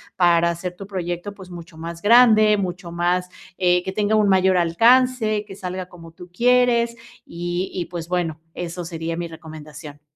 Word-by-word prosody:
para 170 Hz, -1 st, +3 dB
hacer 175 Hz, +1 st, -5 dB
tu 195 Hz, +2 st, -10 dB
proyecto, 180 Hz, 0 st, -4 dB
pues, 190 Hz, -3 st, -13 dB
mucho 170 Hz, -1 st, -11 dB
más 165 Hz, +1 st, -7 dB
grande, 215 Hz, -1 st, +6 dB
mucho 180 Hz, -2 st, -4 dB
más, 175 Hz, +1 st, -1 dB, 0.3 s
eh, 180 Hz, -1 st, +2 dB
que 190 Hz, -, -4 dB
tenga 210 Hz, +2 st, 0 dB
un 210 Hz, -2 st, +3 dB
mayor 190 Hz, -1 st, +3 dB
alcance, 220 Hz, +4 st, +3 dB
que 195 Hz, -, -10 dB
salga 185 Hz, -1 st, -6 dB
como 165 Hz, -2 st, -13 dB
tú 175 Hz, +2 st, -13 dB
quieres 235 Hz, +2 st, +2 dB, 0.3 s
y 175 Hz, +2 st, -4 dB
y, 180 Hz, -, -3 dB
pues, 170 Hz, -2 st, -7 dB
bueno, 170 Hz, -3 st, -2 dB
eso 175 Hz, 0 st, -6 dB
sería 165 Hz, -1 st, -4 dB
mi 170 Hz, 0 st, -3 dB
recomendación. 155 Hz, -2 st, -11 dB
180 Hz, 170 wpm, -21 LUFS, 170-205 Hz, 0.3 s, grande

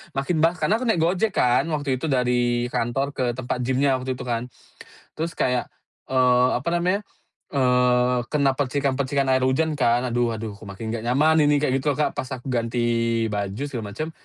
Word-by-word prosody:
makin 155 Hz, +4 st, 0 dB
bah 165 Hz, +2 st, +3 dB
karena 185 Hz, +8 st, +1 dB
aku 255 Hz, -, -3 dB
naik 175 Hz, -8 st, +2 dB
Gojek 185 Hz, +5 st, +1 dB
kan 125 Hz, +5 st, +3 dB
waktu 145 Hz, -5 st, -1 dB
itu 160 Hz, -, -3 dB
dari 125 Hz, -2 st, +1 dB
kantor 135 Hz, +4 st, -1 dB
ke 130 Hz, -, -3 dB
tempat 125 Hz, 0 st, -3 dB
gym-nya 130 Hz, +1 st, +1 dB
waktu 130 Hz, 0 st, -3 dB
itu -, -, -7 dB
kan, 120 Hz, 0 st, -2 dB, 0.7 s
terus 165 Hz, +1 st, -3 dB
kayak, 125 Hz, -1 st, -1 dB, 0.4 s
eee, 125 Hz, -1 st, +4 dB
apa 140 Hz, -, -10 dB
namanya, 180 Hz, +4 st, +1 dB, 0.6 s
eee 125 Hz, -1 st, +3 dB
kena 140 Hz, -3 st, +2 dB
percikan-percikan 140 Hz, 0 st, 0 dB
air 130 Hz, 0 st, +2 dB
hujan 155 Hz, +4 st, +1 dB
kan. 120 Hz, 0 st, +3 dB
Aduh 120 Hz, -1 st, +1 dB
aduh 110 Hz, -1 st, -5 dB
kok 105 Hz, -, -12 dB
makin 110 Hz, +3 st, -6 dB
gak 115 Hz, -1 st, -4 dB
nyaman 155 Hz, +5 st, +3 dB
ini 145 Hz, 0 st, +4 dB
kayak 135 Hz, -2 st, +1 dB
gitu 145 Hz, 0 st, 0 dB
loh -, -, -11 dB
Kak -, -, 0 dB
pas 130 Hz, -, -3 dB
aku 125 Hz, +2 st, -11 dB
ganti 120 Hz, 0 st, -1 dB, 0.5 s
baju 100 Hz, +5 st, -3 dB
segala 110 Hz, -6 st, -6 dB
macem, 155 Hz, +1 st, -4 dB
130 Hz, 190 wpm, -23 LUFS, 120-145 Hz, 0.7 s, eee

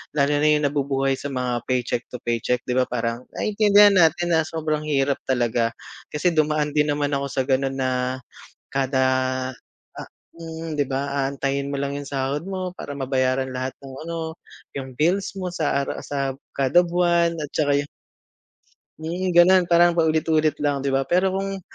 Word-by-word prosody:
lalo 140 Hz, 0 st, +2 dB
na -, -, +4 dB
yung -, -, -4 dB
nabubuhay 135 Hz, -1 st, 0 dB
sa 145 Hz, -, -4 dB
mga 125 Hz, -2 st, -1 dB
paycheck 125 Hz, -1 st, -1 dB
to -, -, -7 dB
paycheck 120 Hz, +1 st, 0 dB
di -, -, -1 dB
ba, 130 Hz, -, +4 dB
parang 120 Hz, 0 st, -3 dB
naiintindihan 205 Hz, -1 st, +5 dB
natin 175 Hz, +1 st, +3 dB
na 160 Hz, -, +3 dB
sobrang 155 Hz, -2 st, -2 dB
hirap 140 Hz, -1 st, +1 dB
talaga 120 Hz, -2 st, +1 dB, 0.4 s
kasi 170 Hz, +4 st, +1 dB
dumaan 150 Hz, -1 st, +1 dB
din 150 Hz, 0 st, +3 dB
naman 145 Hz, 0 st, -1 dB
ako 140 Hz, 0 st, -2 dB
sa 130 Hz, -, 0 dB
ganon 135 Hz, 0 st, 0 dB
na 130 Hz, 0 st, -1 dB, 0.6 s
kada, 135 Hz, -1 st, +1 dB, 0.9 s
ah -, -, -8 dB, 0.3 s
hmm, 165 Hz, -1 st, -7 dB
di 145 Hz, -, +1 dB
ba? 140 Hz, +1 st, -3 dB
Aantayin 140 Hz, 0 st, -2 dB
mo 140 Hz, -, -3 dB
lang 140 Hz, 0 st, -2 dB
yung 145 Hz, -1 st, -6 dB
sahod 135 Hz, +2 st, -2 dB
mo 185 Hz, -1 st, -5 dB
para -, -, -8 dB
mabayaran 130 Hz, 0 st, 0 dB
lahat 130 Hz, +1 st, -2 dB
ng 135 Hz, -1 st, -11 dB
ano, 165 Hz, -1 st, -4 dB, 0.4 s
yung 130 Hz, -2 st, -7 dB
bills 185 Hz, +5 st, +1 dB
mo 180 Hz, -2 st, -4 dB
sa 145 Hz, -4 st, 0 dB
ara -, -, -5 dB
sa 140 Hz, -2 st, -2 dB, 0.2 s
kada 140 Hz, +6 st, +4 dB
buwan 170 Hz, -1 st, +1 dB
at 150 Hz, -2 st, -5 dB
saka 145 Hz, -2 st, +2 dB
yung 145 Hz, -, -3 dB, 1.1 s
mm, 175 Hz, +4 st, -2 dB
ganon, 185 Hz, +1 st, +7 dB
parang 170 Hz, 0 st, +5 dB
paulit-ulit 160 Hz, -1 st, +2 dB
lang, 145 Hz, -2 st, 0 dB
di 140 Hz, -, 0 dB
ba? 135 Hz, 0 st, +1 dB
Pero 185 Hz, +3 st, +2 dB
kung 195 Hz, 0 st, -3 dB
145 Hz, 170 wpm, -23 LUFS, 135-165 Hz, 1.1 s, ganon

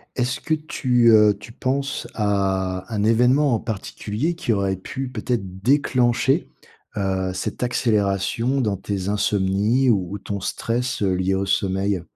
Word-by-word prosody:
Est-ce 125 Hz, +1 st, -1 dB
que 160 Hz, -, +1 dB
tu, 125 Hz, -6 st, +2 dB
heu, 105 Hz, -2 st, +5 dB
tu 110 Hz, +2 st, -11 dB
penses 135 Hz, +3 st, -2 dB
à 95 Hz, -2 st, -1 dB
un 105 Hz, -1 st, 0 dB
événement 125 Hz, +5 st, +3 dB
en 110 Hz, -, +1 dB
particulier 110 Hz, -, -3 dB
qui 165 Hz, -8 st, -2 dB
aurait 100 Hz, -1 st, 0 dB
pu, 130 Hz, +8 st, -6 dB
peut-être 105 Hz, -6 st, -3 dB
déclencher, 125 Hz, -1 st, +2 dB, 0.5 s
heu, 95 Hz, -1 st, -1 dB
cette 95 Hz, -, -4 dB
accélération 115 Hz, +2 st, 0 dB
dans 105 Hz, -4 st, 0 dB
tes 100 Hz, -1 st, -4 dB
insomnies 105 Hz, +5 st, +1 dB
ou, 95 Hz, -1 st, -1 dB
ton 100 Hz, 0 st, -4 dB
stress, 120 Hz, +5 st, -2 dB
heu, 95 Hz, -1 st, +2 dB
lié 95 Hz, +1 st, 0 dB
au 100 Hz, +1 st, -1 dB
sommeil? 95 Hz, 0 st, 0 dB
105 Hz, 145 wpm, -22 LUFS, 95-125 Hz, 0.5 s, heu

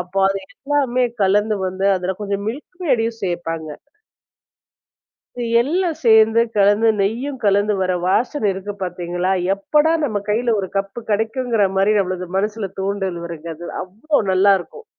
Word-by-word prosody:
அப்போ 180 Hz, +2 st, -4 dB
அது 195 Hz, 0 st, -1 dB, 0.2 s
எல்லாமே 275 Hz, -3 st, 0 dB, 0.2 s
கலந்து 205 Hz, +2 st, +3 dB
வந்து 185 Hz, +1 st, -3 dB
அதுல 185 Hz, +1 st, -2 dB
கொஞ்சம் 200 Hz, -1 st, -2 dB
மில்க் 290 Hz, +10 st, -6 dB
மேடயும் 230 Hz, -6 st, +1 dB
சேப்பாங்க. 165 Hz, -3 st, -3 dB, 1.7 s
இது 240 Hz, -, -2 dB, 0.2 s
எல்லாம் 335 Hz, +4 st, -1 dB
சேர்ந்து 220 Hz, 0 st, +6 dB, 0.2 s
கலந்து, 205 Hz, +3 st, +4 dB
நெய்யும் 245 Hz, +7 st, -2 dB
கலந்து, 205 Hz, +1 st, +3 dB
வர 185 Hz, 0 st, +1 dB
வாசனை 230 Hz, +5 st, +1 dB
இருக்கு 195 Hz, +2 st, -6 dB
பார்த்தீங்களா, 175 Hz, +1 st, -2 dB, 0.2 s
எப்படா 300 Hz, +10 st, +2 dB
நம்ம 210 Hz, -7 st, -2 dB
கையில 230 Hz, +2 st, +1 dB
ஒரு 190 Hz, -, -3 dB
கப்பு 195 Hz, +4 st, -3 dB
கிடைக்குங்கிற 225 Hz, 0 st, +1 dB
மாதிரி, 195 Hz, +2 st, +3 dB
நம்மளுக்கு 185 Hz, -1 st, -2 dB
மனசுல 210 Hz, 0 st, -2 dB
தூண்டல் 190 Hz, -2 st, -2 dB
வருங்க 170 Hz, -1 st, -8 dB
அது 170 Hz, +2 st, -9 dB, 0.2 s
அவ்வளோ 225 Hz, +12 st, -1 dB
நல்லாருக்கும்! 195 Hz, -, +2 dB
205 Hz, 135 wpm, -20 LUFS, 190-235 Hz, 1.7 s, சேர்ந்து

